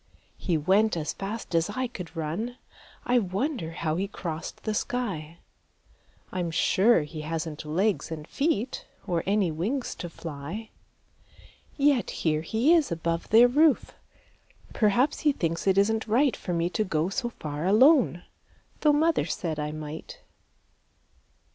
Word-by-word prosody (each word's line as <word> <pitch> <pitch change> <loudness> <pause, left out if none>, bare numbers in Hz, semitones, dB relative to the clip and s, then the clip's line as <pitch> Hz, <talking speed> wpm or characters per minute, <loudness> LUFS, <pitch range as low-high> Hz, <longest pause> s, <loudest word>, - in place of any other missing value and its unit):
He 175 -4 0
went 190 +6 +3
as 155 -1 -2
fast 205 0 -6
as 165 +3 +2
I 255 +5 -2
could 180 -8 -8
run; 175 +11 -3 0.5
I 245 0 +4
wonder 200 - -2
how 160 -1 -2
he 195 +2 -1
crossed 165 -5 -6
the 215 - -1
sky? 190 -10 -3 0.9
I'm 180 -2 -2
sure 190 +4 +3
he 155 +1 -7
hasn't 160 0 -4
legs 190 +7 0
and 155 -1 -6
feet 270 -5 -1 0.2
Or 175 -4 0
any 200 -4 +2
wings 220 - -2
to 175 - -5
fly. 165 +7 -7 1.1
Yet 280 -4 +3 0.2
here 155 -1 +2
he 225 - +2
is 320 - +3
above 165 0 -2
their 230 +3 +7
roof; 295 +2 +3 0.8
Perhaps 235 +7 +2
he 300 - +3
thinks 165 - -2
it 190 0 +4
isn't 220 +3 +2
right 250 +5 +3
For - - -6
me 170 0 +1
to 215 - 0
go 165 -3 0
so 240 +5 -2
far 150 -6 -5
alone, 235 - +5 0.6
Tho' 300 -1 +4
mother 320 +2 +2
said 160 -4 -3
I 150 0 -2
might. 155 0 -7
190 Hz, 145 wpm, -27 LUFS, 165-240 Hz, 1.1 s, their